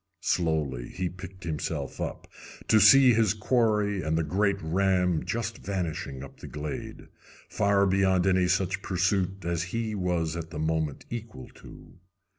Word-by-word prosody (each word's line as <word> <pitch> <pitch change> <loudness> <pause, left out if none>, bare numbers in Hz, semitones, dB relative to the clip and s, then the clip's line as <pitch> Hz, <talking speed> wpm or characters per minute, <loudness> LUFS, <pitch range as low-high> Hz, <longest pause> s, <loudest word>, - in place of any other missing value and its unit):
Slowly 75 -8 0
he 90 -1 -3
picked 95 +2 -11
himself 80 -3 -4
up, - - -5 0.4
to 110 - +5
see 125 +5 +8
his 110 -2 +2
quarry 105 -3 +1
and 80 0 0
the 80 - +1
great 100 +5 +1
ram 90 0 +1
just 100 +4 -3
vanishing 85 -8 -4
up 70 - -12
the - - -9
glade, 75 0 -6 0.4
far 100 -1 +2
beyond 95 -1 +2
any 95 -1 +3
such 95 +1 0
pursuit 95 0 -1
as 85 -1 -1
he 110 -2 -2
was 90 -5 -1
at 85 -1 -5
the 80 - -8
moment 80 -2 -1
equal 115 - -7
to. - - -15
90 Hz, 150 wpm, -27 LUFS, 80-100 Hz, 0.4 s, see